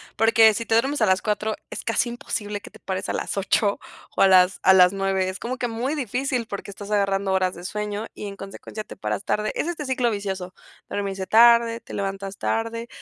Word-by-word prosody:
Porque 225 -1 +5
si 230 +3 -3
te 225 - +1
duermes 270 +4 +1
a 215 - +6
las 185 0 +3
4 215 0 -1 0.2
es - - -6
casi 225 +2 +1
imposible 210 -3 -4
que - - -11
te - - -17
pares 190 -1 -4
a - - -1
las - - -3
8 200 +1 +1 0.4
o - - 0
a 195 - +7
las 185 0 +5
a 190 - +7
las 180 0 +6
9. 195 -1 0
Es 185 0 -4
como 255 +2 -4
que 245 - -1
muy 240 +6 -2
difícil 255 -2 -2
porque 200 -1 -6
estás 200 +1 -9
agarrando 195 -2 +1
horas 185 -1 +1
de 175 - -10
sueño 210 +2 -3
y 210 - -7
en 200 -1 -8
consecuencia 195 +2 -8
te - - -10
paras 105 -1 -3
tarde, 210 0 0
es - - -1
este 320 -4 -4
ciclo 255 -2 +1
vicioso. 195 -4 -4 0.4
Dormirse 195 -2 -3
tarde, 235 0 +5
te - - -12
levantas 195 0 -4
tarde. 230 +1 -2
205 Hz, 220 wpm, -24 LUFS, 195-230 Hz, 0.4 s, a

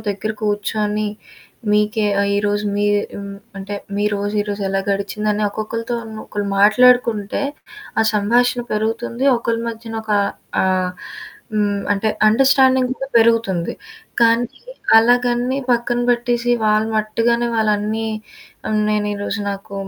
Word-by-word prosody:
దగ్గర 205 +2 -3
కూర్చొని, 210 0 -1 0.6
మీకే 210 0 +2
ఆహ్, 200 0 +1
ఈరోజు 205 0 0
మీ 205 - +1 0.3
హ్మ్. 200 0 -7 0.2
అంటే 195 +1 -6 0.2
మీరోజు 205 0 -1
ఈరోజు 205 -1 -4
ఎలా 195 0 0
గడిచిందని 210 +1 -1
ఒక్కొక్కళ్ళతో‌ను 225 +1 -5
ఒకళ్ళు 205 -1 -3
మాట్లాడుకుంటే 235 0 +4 0.6
ఆ - - +5
సంభాషణ 240 +4 +2
పెరుగుతుంది 230 +3 -2
ఒకళ్ళ 230 -1 -1
మధ్యన 225 0 -7
ఒక 215 -1 -3 0.5
ఆహ్, 185 -1 +1 0.6
హ్మ్. 205 -1 +1
అంటే 205 +2 0 0.2
అండర్స్టాండింగ్ 260 +2 +4
కూడా 270 - -5
పెరుగుతుంది. 225 -7 +2 0.5
కానీ 230 +1 +3 0.5
అలాగని 245 +2 +2
పక్కన 240 0 +1
పెట్టేసి 240 0 0
వాళ్ళ 215 0 +3
మట్టుగానే 230 +2 +1
వాళ్ళు 215 -1 +2
అన్ని 215 +2 -2 0.6
ఆహ్, 215 0 +1
నేను 210 -1 0
ఈరోజు 205 +1 -3
నాకు 200 +1 -7
215 Hz, 120 wpm, -19 LUFS, 205-235 Hz, 0.6 s, ఆ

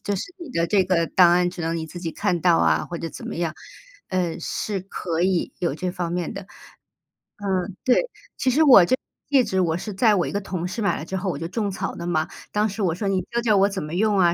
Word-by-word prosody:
就 205 -1 -1
是 - - -2 0.2
你 340 -4 -8
的 170 -7 0
这 190 +1 +3
个 170 -3 +1
档 180 -2 +5
案， 180 0 +3
只 175 - -9
能 165 +1 -1
你 160 -1 -4
自 175 - -9
己 165 -2 -3
看 180 -5 0
到 - - +4
啊， 80 -1 +2
或 170 - -5
者 165 - -5
怎 - - -9
么 - - -4
样， 170 -2 -2 0.5
呃， 180 -3 -1
是 200 +3 -3
可 175 -3 -4
以 185 -2 +1
有 170 -5 -1
这 180 +2 -3
方 175 -1 -3
面 175 -2 -2
的。 195 - -6 1.2
嗯， 190 - -8
对， 250 - +4 0.4
其 260 - +1
实 305 +5 +4
我 245 - +8
这 255 - +2
个 - - -33 0.3
戒 270 -3 +5
指 190 -3 -1
我 165 -3 +2
是 210 +3 -6
在 215 +1 +4
我 175 - +1
一 - - -4
个 200 - -1
同 180 -2 -4
事 225 +5 -4
买 200 - +1
了 - - -6
之 190 - -3
后 190 0 -2
我 - - -5
就 165 - -4
种 205 +1 -2
草 195 - -3
了 170 0 -6
嘛， 160 -1 0 0.2
当 210 +1 +1
时 205 +2 -5
我 170 -4 +1
说： 200 +2 -3
“你 190 -1 +1
教 235 0 0
教 215 -4 +3
我 195 +1 +5
怎 195 -5 -4
么 150 +2 -6
用 210 +1 +2
啊？” 170 -1 +4
185 Hz, 290 characters per minute, -23 LUFS, 170-205 Hz, 1.2 s, 我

